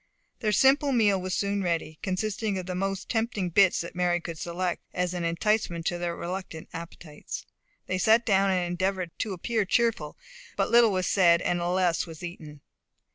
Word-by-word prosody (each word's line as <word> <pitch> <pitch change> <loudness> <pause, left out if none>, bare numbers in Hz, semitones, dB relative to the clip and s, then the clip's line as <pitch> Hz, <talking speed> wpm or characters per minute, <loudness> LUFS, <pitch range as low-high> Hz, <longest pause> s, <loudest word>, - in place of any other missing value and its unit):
Their 215 -3 0
simple 275 +6 +4
meal 210 -6 +3
was 185 0 -2
soon 200 0 0
ready, 165 -3 -2
consisting 205 +2 -2
of 185 - -4
the 185 - -4
most 195 +1 -2
tempting 225 -6 -1
bits 190 +1 +4
that 170 - -7
Mary 175 -1 +1
could 170 -2 -7
select, 175 +1 -2
as 180 0 -1
an 175 -1 -3
enticement 170 0 0
to 175 +1 -1
their 175 -1 -2
reluctant 175 -2 -6
appetites. 165 -2 -8 0.4
They 185 - -2
sat 225 +4 +4
down, 195 -3 +3
and 185 -2 +1
endeavoured 180 0 -2
to 210 - -2
appear 220 +4 -1
cheerful, 205 -7 0 0.4
but - - 0
little 235 -2 +6
was 185 -1 0
said, 170 -3 +4
and 175 - 0
less 175 -1 +1
was 165 0 -10
eaten. 155 -4 -8
185 Hz, 180 wpm, -27 LUFS, 170-205 Hz, 0.4 s, little